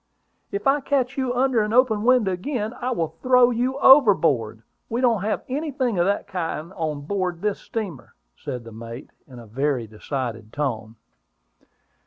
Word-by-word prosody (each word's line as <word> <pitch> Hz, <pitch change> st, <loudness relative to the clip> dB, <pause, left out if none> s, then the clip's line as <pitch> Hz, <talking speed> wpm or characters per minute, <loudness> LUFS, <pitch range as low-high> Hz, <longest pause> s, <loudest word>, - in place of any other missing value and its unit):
"If 400 Hz, -4 st, -4 dB
I 275 Hz, +1 st, +4 dB
ever -, -, -7 dB
catch 270 Hz, -1 st, 0 dB
you 260 Hz, -2 st, -1 dB
under 255 Hz, -2 st, +2 dB
an 210 Hz, +1 st, -2 dB
open 240 Hz, -4 st, +3 dB
window 240 Hz, -4 st, +3 dB
again, 215 Hz, +4 st, -3 dB
I 250 Hz, -, -1 dB
will 165 Hz, -9 st, -2 dB
throw 250 Hz, -1 st, +5 dB
you 250 Hz, +3 st, -1 dB
overboard. 170 Hz, -, +5 dB, 0.3 s
We 230 Hz, -, -1 dB
don't 235 Hz, -6 st, +2 dB
have 215 Hz, +2 st, -2 dB
anything 260 Hz, -, -2 dB
of 175 Hz, -, +3 dB
that 200 Hz, -, 0 dB
kind 170 Hz, -1 st, -4 dB
on 155 Hz, -5 st, -3 dB
board 180 Hz, +3 st, -2 dB
of 165 Hz, -, -20 dB
this 210 Hz, -1 st, -1 dB
steamer," 200 Hz, -, -6 dB, 0.2 s
said 125 Hz, -5 st, -6 dB
the 115 Hz, -, -11 dB
mate, 115 Hz, +4 st, -9 dB, 0.2 s
in 130 Hz, -3 st, -13 dB
a 120 Hz, -, -11 dB
very 130 Hz, +2 st, -1 dB
decided 115 Hz, 0 st, -5 dB
tone. 115 Hz, -7 st, -3 dB
195 Hz, 175 wpm, -23 LUFS, -, 0.3 s, throw